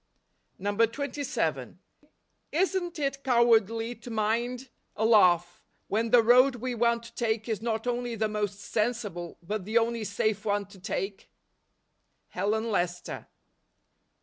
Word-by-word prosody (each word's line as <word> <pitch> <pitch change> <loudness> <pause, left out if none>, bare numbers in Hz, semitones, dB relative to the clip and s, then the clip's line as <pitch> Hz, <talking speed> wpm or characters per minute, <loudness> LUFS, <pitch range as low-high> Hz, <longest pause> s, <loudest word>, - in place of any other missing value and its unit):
27. 230 +8 -1 0.7
Isn't 350 0 0
it 275 -2 -2
cowardly 230 -2 +3
to 245 - -12
mind 235 +4 -1 0.3
a 220 - 0
laugh, 175 -6 +4 0.3
when 225 +2 0
the 235 0 +6
road 250 +3 +6
we 250 +1 -3
want 235 0 +1
to 235 - -12
take 220 -1 -1
is 220 -3 -2
not 225 -1 -2
only 245 -1 -2
the 220 0 0
most 210 -2 -3
sensible, 210 -7 -2
but 210 +3 -3
the 215 +5 0
only 230 0 +1
safe 210 0 -1
one 205 -1 0
to 200 - -15
take? 195 0 -4 1.0
Helen 220 +2 -1
Lester. 175 -3 -2
225 Hz, 125 wpm, -28 LUFS, 210-240 Hz, 1.0 s, the